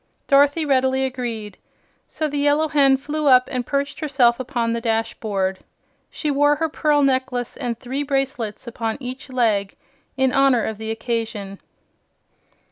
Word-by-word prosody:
Dorothy 285 +3 +4
readily 265 -1 +2
agreed, 235 -6 -5 0.5
so 310 - -3
the 290 -1 -3
Yellow 290 +2 +2
Hen 275 -2 +4
flew 295 +2 -3
up 255 -2 +6
and 250 -2 -3
perched 280 0 -2
herself 265 -6 +2
upon 240 -3 -1
the 230 - -2
dashboard. 215 -4 -1 0.5
She 300 - -3
wore 290 +1 +3
her 325 +2 -1
pearl 295 -1 +2
necklace 260 -2 0
and 240 -4 -3
three 260 +3 -4
bracelets 270 -6 -2
upon 225 -2 -3
each 255 +1 -7
leg, 220 -6 0 0.4
in 265 -1 +2
honor 275 -4 +3
of 220 -1 -4
the 220 0 -5
occasion. 225 -3 -4
260 Hz, 145 wpm, -21 LUFS, 230-280 Hz, 0.5 s, up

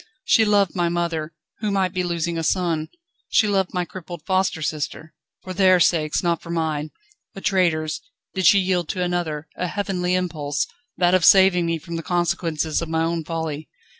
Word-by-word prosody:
She 220 - +5
loved 205 -3 +3
my 175 -2 +1
mother, 170 -2 -2 0.3
who 215 - -1
might 190 -2 0
be 185 - 0
losing 170 -1 -2
a 165 - -1
son; 165 -2 0 0.4
she 215 - +3
loved 195 -2 +1
my 180 -1 -1
crippled 175 -2 -9
foster 185 -4 0
sister; 155 +1 -4 0.3
for 185 - -6
their 185 -1 +5
sakes, 160 -2 +2
not 170 -2 0
for - - -12
mine 155 -2 -1 0.5
a - - -6
traitor's 155 -6 +1 0.3
did 190 -3 +2
she 200 - +7
yield 180 -3 0
to 180 - -1
another, 165 -4 -2
a 180 - -2
heavenly 180 -2 -1
impulse, 155 -6 -1 0.3
that 175 0 +3
of 185 -2 +3
saving 190 -2 +6
me 165 0 0
from 170 +1 -6
the - - -3
consequences 170 -3 -1
of 165 - -4
my 160 0 +1
own 165 0 -1
folly. 160 -2 -4
175 Hz, 185 wpm, -22 LUFS, 160-185 Hz, 0.5 s, she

